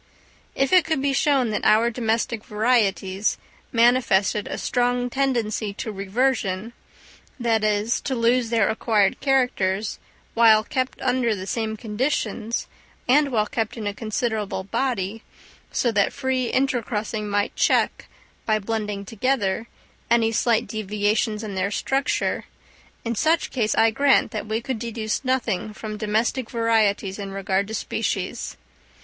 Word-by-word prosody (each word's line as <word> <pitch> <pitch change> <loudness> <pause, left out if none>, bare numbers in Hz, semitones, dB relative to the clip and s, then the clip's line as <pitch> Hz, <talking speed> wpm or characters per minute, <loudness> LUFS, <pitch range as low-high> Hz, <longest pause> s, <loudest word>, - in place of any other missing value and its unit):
If 270 +6 +1
it 365 -2 +7
could 320 -2 -1
be 275 0 +1
shown 270 -5 +2
that 210 - -2
our 225 +3 +4
domestic 225 -1 -1
varieties 210 -3 +1 0.3
manifested 230 -4 +3
a - - -4
strong 245 0 0
tendency 235 -6 -1
to 220 - -4
reversion—that 225 +1 -2
is, 215 +2 +1
to 265 - -2
lose 235 0 +2
their 225 -3 +3
acquired 215 -3 +1
characters, 220 -7 +1 0.3
while 220 -2 +6
kept 255 +3 -2
under 250 -3 +1
the 185 -1 -6
same 220 +1 -2
conditions 230 0 -2 0.4
and 280 +2 +4
while 215 -3 +2
kept 220 +1 -3
in 220 - -5
a 205 - -1
considerable 215 -2 -2
body, 215 -1 -2 0.5
so 240 - +1
that 200 -2 +2
free 260 -3 -1
intercrossing 225 -5 -1
might 205 0 0
check, - - +1 0.4
by 215 -1 +3
blending 210 -1 -3
together, 225 -1 -1 0.4
any 230 -1 +3
slight 230 0 +2
deviations 210 +1 -1
in 210 -2 -5
their 190 +1 0
structure, 270 +6 -1 0.6
in 230 - -1
such 315 +8 +1
case, 220 -5 0
I 225 0 +4
grant 280 +4 +3
that 215 -2 -4
we 220 +2 -1
could 250 -1 -3
deduce 225 0 -3
nothing 235 -6 -1
from 215 -1 -6
domestic 220 +3 0
varieties 220 -4 +1
in 200 -1 -5
regard 195 0 -1
to 220 - -4
species. - - -3
225 Hz, 135 wpm, -23 LUFS, 210-245 Hz, 0.6 s, it